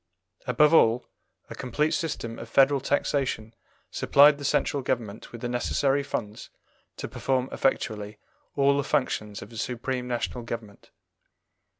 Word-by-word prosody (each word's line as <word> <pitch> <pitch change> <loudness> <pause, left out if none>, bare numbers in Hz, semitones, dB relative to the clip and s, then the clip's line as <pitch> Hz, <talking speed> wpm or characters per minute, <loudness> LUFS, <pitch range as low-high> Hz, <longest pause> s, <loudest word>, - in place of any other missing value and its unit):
Above 150 +6 +4
all, 120 -5 +5 0.4
a - - -8
complete 150 +5 -1
system 130 -9 -3
of 115 - -9
federal 140 +3 +4
taxation 135 -5 -1 0.4
supplied 145 +1 +5
the - - -7
Central 140 0 +1
Government 115 -4 -3
with 120 - -9
the 120 - -2
necessary 135 +3 +1
funds 110 -5 -5 0.5
to - - -5
perform 130 -1 -1
effectually 105 -5 -1 0.4
all 140 0 +4
the 140 - +1
functions 105 -9 -1
of 105 - -14
a - - -9
supreme 125 +2 -3
national 120 0 -3
government. 115 -3 -8
125 Hz, 135 wpm, -26 LUFS, 115-140 Hz, 0.5 s, all